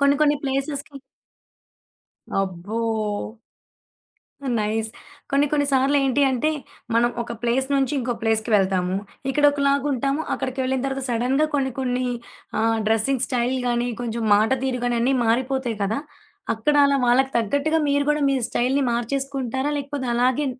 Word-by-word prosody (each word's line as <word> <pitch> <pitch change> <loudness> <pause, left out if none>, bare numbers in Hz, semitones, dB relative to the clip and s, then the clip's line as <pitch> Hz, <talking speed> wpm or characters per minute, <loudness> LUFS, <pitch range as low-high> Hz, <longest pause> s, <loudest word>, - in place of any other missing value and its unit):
కొన్ని, 280 0 +4
కొన్ని 295 -1 +4
ప్లేసెస్‌కి 275 +1 -3 1.4
అబ్బో! 195 +3 -2 1.8
నైస్. 220 +1 -1 0.4
కొన్ని, 280 +1 +3
కొన్ని 290 -1 +2
సార్లు 270 +2 +3
ఏంటి 270 +2 +2
అంటే, 260 +5 +1 0.4
మనం 240 +1 +3
ఒక 235 - -6
ప్లేస్ 250 +3 +1
నుంచి 270 0 +1
ఇంకో 245 0 -1
ప్లేస్‌కి 220 0 +1
వెళ్తాము. 190 -1 +1 0.3
ఇక్కడొకలాగుంటాము. 280 -1 +2
అక్కడికి 260 0 -3
వెళ్ళిన 260 0 -1
తర్వాత 270 -1 -3
సడెన్‌గా 255 +6 +1
కొన్ని, 265 -3 0
కొన్ని 255 0 -1 0.6
ఆహ్, 225 0 +2
డ్రెసింగ్ 235 +4 +1
స్టైల్ 250 0 0
గానీ, 240 0 0
కొంచెం 235 -1 -3
మాట 215 +3 +3
తీరు 255 -2 -1
గానీ, 240 -1 +1
అన్నీ 260 +3 +2
మారిపోతాయి 250 -1 0
కదా! 215 +6 0 0.6
అక్కడ 260 +7 0
అలా 280 0 +3
వాళ్ళకి 265 +2 +3
తగ్గట్టుగా 285 +8 +1
మీరు 285 0 +2
కూడా 300 0 +1
మీ 270 - +2
స్టైల్‌ని 265 +3 +1
మార్చేసుకుంటారా? 265 +2 -2
లేకపోతే, 280 -2 -4
అలాగే 255 +4 +2
260 Hz, 135 wpm, -23 LUFS, 235-280 Hz, 1.8 s, కొన్ని